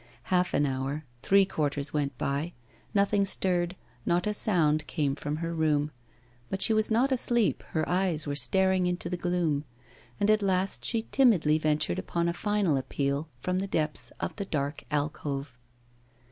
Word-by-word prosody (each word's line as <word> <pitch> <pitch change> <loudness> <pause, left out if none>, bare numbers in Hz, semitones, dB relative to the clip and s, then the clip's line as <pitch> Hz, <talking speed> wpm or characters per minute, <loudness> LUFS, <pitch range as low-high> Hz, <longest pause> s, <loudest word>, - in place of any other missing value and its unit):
Half 180 0 +2
an 145 - +3
hour, 135 +3 -3 0.2
three 195 0 +5
quarters 145 -5 -2
went 140 -4 -1
by, 145 +7 -2 0.4
nothing 200 0 +2
stirred, 180 -2 +1 0.3
not 175 +4 +1
a 210 - 0
sound 155 -8 +1
came 145 -4 0
from 145 +1 -3
her 165 +1 -3
room; 150 -2 +1 0.6
but 195 - -2
she 220 - +3
was 215 0 +2
not 240 +5 +2
asleep, 240 -3 +1
her 155 -1 0
eyes 180 -4 +1
were 145 - -2
staring 185 +7 +3
into 180 -1 -2
the - - 0
gloom; 175 -5 0 0.6
and 205 +1 +3
at 215 0 +3
last 190 0 0
she 225 -2 -1
timidly 175 - +4
ventured 155 0 0
upon 170 0 -1
a 170 - 0
final 200 -4 +1
appeal, 140 +3 -2
from 180 +4 0
the 195 - -2
depths 155 -5 -2
of - - -3
the 200 - -3
dark 145 -4 -3
alcove. 145 -2 -2
170 Hz, 165 wpm, -28 LUFS, 150-195 Hz, 0.6 s, three